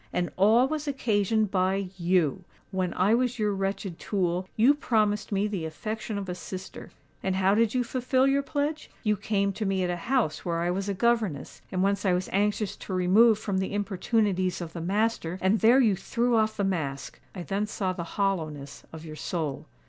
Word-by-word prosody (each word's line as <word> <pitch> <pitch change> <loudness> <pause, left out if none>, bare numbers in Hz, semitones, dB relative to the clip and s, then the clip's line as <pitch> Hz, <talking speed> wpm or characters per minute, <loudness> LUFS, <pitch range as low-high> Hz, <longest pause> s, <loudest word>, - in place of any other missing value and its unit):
And 175 -1 -1
all 220 +7 +5
was 305 +1 -3
occasioned 220 -5 +1
by 190 0 0
you! 175 -1 +1 0.3
When 185 -2 -1
I 195 +4 +3
was 250 +1 +1
your 210 -2 +1
wretched 195 -2 -3
tool, 185 -2 -1
you 240 +6 +5
promised 215 -8 0
me 200 +1 +1
the 200 -5 -3
affection 215 +7 -4
of 200 -1 -4
a 180 - -3
sister; 185 +1 -8 0.3
and 190 -1 -1
how 190 +1 +3
did 225 +2 +2
you 250 - +2
fulfil 255 +2 +1
your 275 +1 +3
pledge? 295 +2 -3
You 210 -2 +2
came 200 0 0
to 215 - -4
me 195 -2 0
at 180 - 0
a - - -1
house 245 - +1
where 170 -1 -1
I 175 +1 +1
was 195 +2 -2
a 200 - -1
governess, 220 - 0
and 185 0 0
whence 200 0 +1
I 190 -3 +3
was 180 +1 -1
anxious 205 0 0
to 190 - -7
remove 205 +5 +5
from 195 -3 -2
the 190 +1 -2
importunities 195 -2 0
of 165 -2 -6
the 170 - -5
master; 195 -1 0
and 190 +4 +2
there 235 +7 +6
you 220 -7 +4
threw 235 +5 0
off 220 -1 +1
the 200 - 0
mask. 145 -8 -3 0.2
I 180 - -5
then 200 +5 -2
saw 190 -3 -2
the 175 - -5
hollowness 155 -8 -2
of 160 0 -9
your 155 -1 -8
soul. 155 -4 -4
195 Hz, 200 wpm, -27 LUFS, 180-220 Hz, 0.3 s, there